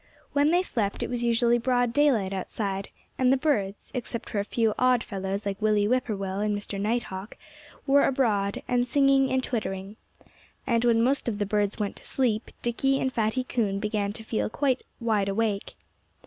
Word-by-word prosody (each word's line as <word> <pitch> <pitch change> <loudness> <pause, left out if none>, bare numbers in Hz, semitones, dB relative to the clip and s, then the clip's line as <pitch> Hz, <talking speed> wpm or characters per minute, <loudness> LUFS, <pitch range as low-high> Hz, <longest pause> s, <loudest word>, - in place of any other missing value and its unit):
When 285 +1 +4
they 350 +3 +3
slept 210 - -2
it - - -4
was 240 -1 -2
usually 235 0 +3
broad 245 -1 +1
daylight 235 -10 +3
outside, 195 +1 -3 0.3
and 255 -1 +4
the 270 - +4
birds 210 -9 -1
except 240 -2 -5
for 205 - 0
a - - +1
few 225 +1 +1
odd 250 -2 +3
fellows 195 0 -4
like 200 +1 -3
Willie 210 -1 +3
Whip 255 +2 +2
poor 220 - -2
will 195 0 -3
and 210 0 0
Mr. 200 -1 -5
Night 235 +4 +1
Hawk 190 +3 -8 0.5
were 280 0 +5
abroad, 210 -7 0
and 245 0 +1
singing, 275 -1 +3
and 260 0 +1
twittering. 200 -4 -4 0.7
And 235 -2 +1
when 230 -1 +4
most 270 +2 +1
of 220 -3 -1
the 205 - 0
birds 205 0 0
went 205 -2 -2
to - - -13
sleep 235 -4 0
Dickie 270 +3 +1
and 260 -1 -1
Fatty 225 +3 0
Coon 215 -6 -1
began 210 -1 -1
to 225 - -8
feel 220 0 -1
quite 265 +2 0 0.2
wide 215 -4 +1
awake. 205 0 -1
225 Hz, 190 wpm, -27 LUFS, 205-255 Hz, 0.7 s, were